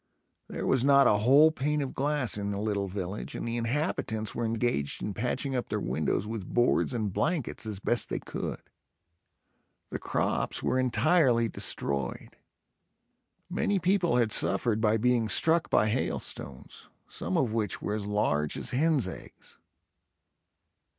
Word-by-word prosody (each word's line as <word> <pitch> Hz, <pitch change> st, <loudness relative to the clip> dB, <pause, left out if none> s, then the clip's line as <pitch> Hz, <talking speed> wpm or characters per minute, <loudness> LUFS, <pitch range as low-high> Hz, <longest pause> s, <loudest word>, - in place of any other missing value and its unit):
There -, -, -5 dB
was 130 Hz, -2 st, +2 dB
not 140 Hz, 0 st, +6 dB
a 105 Hz, -, +4 dB
whole 140 Hz, +8 st, +6 dB
pane 150 Hz, 0 st, -1 dB
of 140 Hz, -2 st, -3 dB
glass 145 Hz, -3 st, 0 dB
in 100 Hz, -1 st, -3 dB
the 100 Hz, -1 st, -3 dB
little 100 Hz, -2 st, -1 dB
village 95 Hz, +1 st, -5 dB
and -, -, -4 dB
the 115 Hz, -, -2 dB
inhabitants 115 Hz, -3 st, -1 dB
were 120 Hz, -, -2 dB
engaged 110 Hz, -11 st, -1 dB
in 105 Hz, -, -3 dB
patching 130 Hz, +5 st, -2 dB
up 125 Hz, -, -2 dB
their -, -, -1 dB
windows 95 Hz, -, -1 dB
with 110 Hz, -3 st, -6 dB
boards 120 Hz, +1 st, +2 dB
and 105 Hz, -5 st, -2 dB
blankets, 150 Hz, -, -1 dB
as 105 Hz, -3 st, -4 dB
best 120 Hz, +3 st, 0 dB
they -, -, -2 dB
could. -, -, -5 dB, 1.3 s
The -, -, -3 dB
crops -, -, -1 dB
were 130 Hz, -, +1 dB
entirely 130 Hz, -2 st, +3 dB
destroyed. 70 Hz, -, -3 dB, 1.1 s
Many 205 Hz, -, 0 dB
people 180 Hz, -3 st, +2 dB
had 115 Hz, -3 st, +2 dB
suffered 105 Hz, +3 st, +2 dB
by 110 Hz, 0 st, +3 dB
being 120 Hz, -1 st, +1 dB
struck 165 Hz, +7 st, +2 dB
by 110 Hz, -, +3 dB
hailstones, 90 Hz, -, -4 dB, 0.2 s
some 90 Hz, +2 st, -3 dB
of 115 Hz, -4 st, +1 dB
which 110 Hz, -4 st, -1 dB
were 105 Hz, -, -3 dB
as 105 Hz, -1 st, -3 dB
large 75 Hz, -8 st, 0 dB
as -, -, -2 dB
hens 140 Hz, -, +2 dB
eggs. -, -, -10 dB
115 Hz, 150 wpm, -28 LUFS, 105-135 Hz, 1.3 s, not